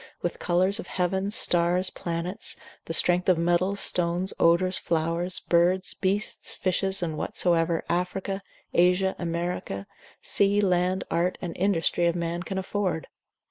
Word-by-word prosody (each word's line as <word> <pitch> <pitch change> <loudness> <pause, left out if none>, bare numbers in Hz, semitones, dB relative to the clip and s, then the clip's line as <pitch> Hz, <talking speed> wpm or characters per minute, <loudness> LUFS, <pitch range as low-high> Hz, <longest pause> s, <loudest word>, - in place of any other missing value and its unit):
with 175 - -2
colours 185 +4 +1
of - - -7
heavens, 190 +3 -1
stars, 175 +2 +3
planets: 170 +3 -1 0.3
the - - -6
strength 180 +2 +2
of 180 - +4
metals, 175 +4 +1
stones, 175 +1 +1
odours, 180 +2 +3
flowers, 170 +2 -1
birds, 180 +2 +2
beasts, 200 +2 -1
fishes, 190 0 -1
and 160 -3 -3
whatsoever 170 -1 +1
Africa, 190 +3 -2 0.3
Asia, 180 +2 +3
America, 170 - -3 0.3
sea, 200 +1 +3
land, 185 -1 +1
art, 175 +2 0
and 170 -3 -5
industry 175 -2 +1
of 170 - +1
man 170 0 -2
can 190 +2 -5
afford? 190 -3 -2
180 Hz, 135 wpm, -26 LUFS, 170-190 Hz, 0.3 s, of